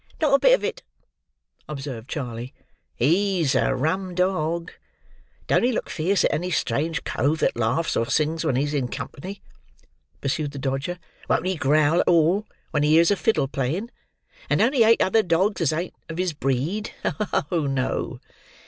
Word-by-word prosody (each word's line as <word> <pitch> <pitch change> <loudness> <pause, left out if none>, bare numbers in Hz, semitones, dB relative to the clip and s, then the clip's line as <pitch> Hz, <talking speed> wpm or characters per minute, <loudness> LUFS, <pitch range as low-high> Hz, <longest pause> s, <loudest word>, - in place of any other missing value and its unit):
"Not 300 -3 +2
a 275 - +6
bit - - +6
of - - -7
it," - - -3 0.9
observed 135 -5 -6
Charley. 125 -3 -5 0.4
"He's 170 - +2
a 130 - +2
rum 175 +7 -1
dog. 170 -2 0 0.7
Don't - - +3
he 245 - +2
look - - -3
fierce 180 +4 +1
at - - +1
any 180 +4 -1
strange 160 +2 -1
cove 145 +6 0
that - - +2
laughs 120 +8 0
or 115 - 0
sings 155 +4 0
when 130 - +1
he's 145 +3 0
in 135 -4 0
company!" 140 +10 -7 0.8
pursued 140 +1 -2
the - - -7
Dodger. 135 +6 -2 0.3
"Won't 160 - +2
he 185 0 0
growl 155 +2 +3
at - - +1
all, 175 +5 +3 0.2
when 150 - +1
he 150 +1 +3
hears 165 +4 +5
a - - +4
fiddle 220 - +1
playing! 150 - -2 0.6
And - - +2
don't 245 +5 +3
he 260 - +2
hate 230 +1 +5
other 220 +4 +3
dogs 185 +2 +1
as 160 - +2
ain't 170 +3 -3 0.2
of 165 - -6
his 180 -2 0
breed! 145 - -1 0.6
Oh, 165 -5 +1
no!" 135 -1 -2
160 Hz, 175 wpm, -24 LUFS, 140-185 Hz, 0.9 s, a